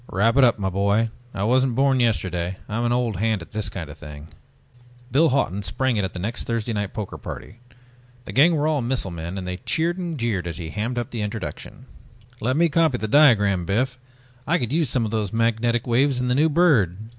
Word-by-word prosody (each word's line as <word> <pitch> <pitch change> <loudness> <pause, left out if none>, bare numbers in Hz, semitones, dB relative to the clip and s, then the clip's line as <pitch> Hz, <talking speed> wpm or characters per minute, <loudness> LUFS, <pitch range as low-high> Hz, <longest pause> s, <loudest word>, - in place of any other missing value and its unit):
"Wrap 115 +5 +2
it 140 - +5
up, 120 -2 +4
my 95 -2 -2
boy, 100 +4 +1 0.2
I 100 - -4
wasn't 130 +2 +2
born 135 0 +3
yesterday. 95 -6 0
I'm 115 +3 -2
an 120 - +1
old 120 -4 0
hand 110 -2 0
at - - -16
this 110 -2 -2
kind 85 -5 -6
of 75 +1 -12
thing." 75 0 -10 0.8
Biff 155 +6 +4
Hawton 115 -8 0
sprang 130 +5 -1
it 105 - 0
at 95 - -3
the - - -7
next 105 +7 -3
Thursday 115 0 -2
night 105 -2 -2
poker 105 -4 -6
party. 115 - -9 0.7
The - - -7
gang 160 +6 +5
were 150 0 +1
all 155 -3 +1
missile 120 -5 -1
men 85 +3 -6
and 90 -1 -5
they 90 0 -3
cheered 170 - -1
and 170 -3 -4
jeered 110 - -1
as 85 - -4
he 80 -3 -6
hammed 115 +4 -3
up 120 -2 -3
the 115 - -3
introduction. 105 -3 -6 0.5
"Let 130 +5 0
me 170 +1 +4
copy 160 -4 +2
the 110 - -3
diagram, 105 - +4
Biff, 125 +8 -1 0.5
I 170 +3 +3
could 125 -4 -3
use 160 -4 +1
some 120 -2 +1
of 105 - -4
those 105 -4 -1
magnetic 115 +1 +1
waves 130 +2 +2
in 125 0 -1
the - - +2
new 150 +5 +3
bird!" 145 - +3
115 Hz, 225 wpm, -23 LUFS, 100-130 Hz, 0.8 s, it